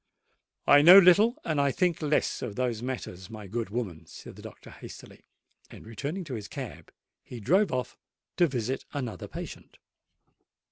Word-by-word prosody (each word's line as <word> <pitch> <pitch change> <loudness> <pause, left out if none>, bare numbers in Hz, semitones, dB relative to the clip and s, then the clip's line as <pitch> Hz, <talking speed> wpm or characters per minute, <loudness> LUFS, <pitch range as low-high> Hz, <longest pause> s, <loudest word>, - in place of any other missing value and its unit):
"I 145 0 +7
know 175 +5 +10
little, 205 - +6
and 155 -3 -1 0.2
think 175 -3 0
less 150 -1 0
of 110 -5 -5
those 120 -3 -2
matters, 120 -8 -6
my 110 -2 -9
good 110 +3 -4
woman," 95 -8 -5
said - - -12
the - - -13
doctor - - -12
hastily; - - -13 0.4
and, - - -13
returning 140 - -5
to 150 -6 -8
his 105 -4 -6
cab, - - -9 0.3
he 125 - -9
drove 190 - +2
off 125 -1 -4 0.4
to 175 - +4
visit 130 -1 -3
another 130 -6 -5
patient. - - -9
130 Hz, 155 wpm, -27 LUFS, 110-165 Hz, 0.4 s, know